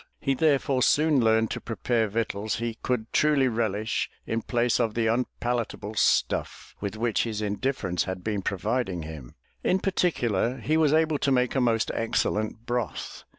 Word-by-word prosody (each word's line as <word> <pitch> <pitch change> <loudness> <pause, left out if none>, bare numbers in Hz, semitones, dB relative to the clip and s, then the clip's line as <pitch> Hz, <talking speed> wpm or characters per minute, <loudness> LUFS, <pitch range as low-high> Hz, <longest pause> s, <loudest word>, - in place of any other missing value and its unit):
He 135 - +1
therefore 140 -2 +2
soon 150 -1 +4
learned 110 0 +3
to - - -4
prepare 115 0 0
victuals 110 0 -2
he 115 0 -2
could 120 -3 -2
truly 150 -3 +4
relish 110 -2 -1 0.2
in 115 0 -1
place 120 +1 +1
of 115 -3 0
the 115 -1 +1
unpalatable 120 -2 -2
stuff - - 0
with 100 +1 -4
which 115 -1 +1
his 110 -3 -2
indifference 105 -3 -1
had 95 -1 -5
been 105 -2 -1
providing 100 -2 -1
him. 75 -6 -9 0.3
In 185 - +3
particular 130 - 0
he 135 +6 0
was 155 -2 +4
able 155 -1 +2
to 140 - +1
make 125 -1 +2
a 135 - +1
most 115 -2 +1
excellent 110 0 -1
broth. 120 -3 -4
115 Hz, 160 wpm, -26 LUFS, 110-130 Hz, 0.3 s, soon